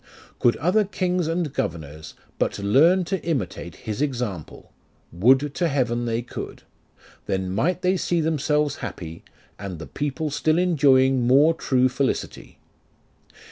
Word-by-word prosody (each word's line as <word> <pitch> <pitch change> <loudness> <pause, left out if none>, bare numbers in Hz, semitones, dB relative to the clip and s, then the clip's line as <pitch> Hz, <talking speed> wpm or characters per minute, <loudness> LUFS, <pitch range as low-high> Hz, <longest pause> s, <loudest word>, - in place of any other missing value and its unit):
Could 120 - +3
other 185 +8 +2
kings 180 -3 -1
and 165 -3 -2
governors 80 -5 -5 0.2
But - - 0
learn 150 - +4
to 190 +1 -3
imitate 100 - -3
his 110 +3 -3
example, 120 - -4 0.4
(Would 130 +10 +3
to 175 +1 0
heaven 120 -5 0
they 115 0 -1
could 120 - -8 0.3
!) - - -26
Then 95 -1 -1
might 170 - 0
they 185 +1 +2
see 175 -1 0
themselves 150 -2 0
happy, 80 -1 -7 0.4
And 95 -3 -6
the 80 - -8
people 145 - -3
still 155 +2 +1
enjoying 135 -7 +3
more 145 +6 +5
true 130 -5 +2
felicity. 135 +1 -3
135 Hz, 140 wpm, -23 LUFS, 110-165 Hz, 0.4 s, more